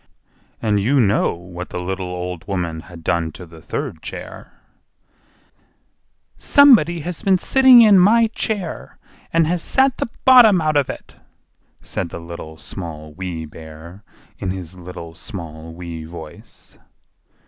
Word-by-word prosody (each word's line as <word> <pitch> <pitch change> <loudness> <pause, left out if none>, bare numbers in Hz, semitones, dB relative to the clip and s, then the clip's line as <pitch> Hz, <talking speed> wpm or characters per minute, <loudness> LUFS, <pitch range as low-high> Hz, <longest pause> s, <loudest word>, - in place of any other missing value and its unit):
And 105 -2 +2
you 130 +8 +2
know 105 -6 +2
what 90 +1 -9
the - - -6
little 95 +1 -4
old 90 -1 -6
woman 85 -5 -3
had 85 0 -13
done 85 -1 0
to 90 - -10
the 80 -1 -15
third - - -5
chair. - - -9 1.9
"SOMEBODY 215 - +5
HAS 175 +2 -5
BEEN 190 -1 +3
SITTING 260 +4 +6
IN 205 -3 +7
MY 225 +5 +5
CHAIR, 200 -7 -4 0.3
AND 165 -1 +3
HAS 170 +2 -1
SAT 265 +5 +2
THE - - -3 0.2
BOTTOM 240 -7 +7
OUT 155 -1 0
OF 140 -3 +1
IT!" - - -9 0.6
said - - -4
the - - -7
Little, 85 -2 -9
Small, 75 -4 -8
Wee 90 -2 -5
Bear, 80 +5 -12 0.4
in 95 - -3
his 90 -2 -6
little, 85 -2 -9
small, 80 -2 -9
wee 85 -1 -8
voice. 80 -2 -13
90 Hz, 140 wpm, -20 LUFS, -, 1.9 s, IN